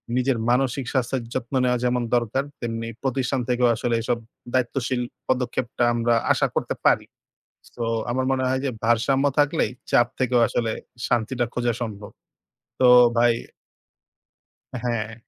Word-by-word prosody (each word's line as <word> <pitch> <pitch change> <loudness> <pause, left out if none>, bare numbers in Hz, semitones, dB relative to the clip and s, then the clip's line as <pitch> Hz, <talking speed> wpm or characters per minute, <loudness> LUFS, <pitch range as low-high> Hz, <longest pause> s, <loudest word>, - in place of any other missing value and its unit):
নিজের 130 -1 +1
মানসিক 130 +1 +1
স্বাস্থ্যের 130 0 0
যত্ন 130 +1 -4
নেওয়া 125 -1 +2
যেমন 125 0 +1
দরকার, 120 +3 0 0.2
তেমনি 115 -1 -3 0.2
প্রতিষ্ঠান 130 0 0
থেকেও 125 0 +3
আসলে 120 +1 -1
এসব 120 +1 0 0.4
দায়িত্বশীল 130 0 0 0.3
পদক্ষেপটা 125 0 -1
আমরা 120 0 +2 0.2
আশা - - +1
করতে - - -1
পারি। - - +4 0.7
সো 120 - -3 0.3
আমার 130 +2 0
মনে 130 -1 0
হয় 130 0 0
যে 135 - 0
ভারসাম্য 130 +4 +2
থাকলেই 145 +2 +2 0.2
চাপ 120 - +5
থেকেও 125 -1 +3
আসলে 115 -2 -1 0.4
শান্তিটা 120 +1 0
খোঁজা 120 -1 0
সম্ভব। 105 -3 -6 0.7
তো 130 - +6 0.3
ভাই 120 0 +5 1.5
হ্যাঁ। 115 -2 -2
125 Hz, 135 wpm, -24 LUFS, 120-130 Hz, 1.5 s, তো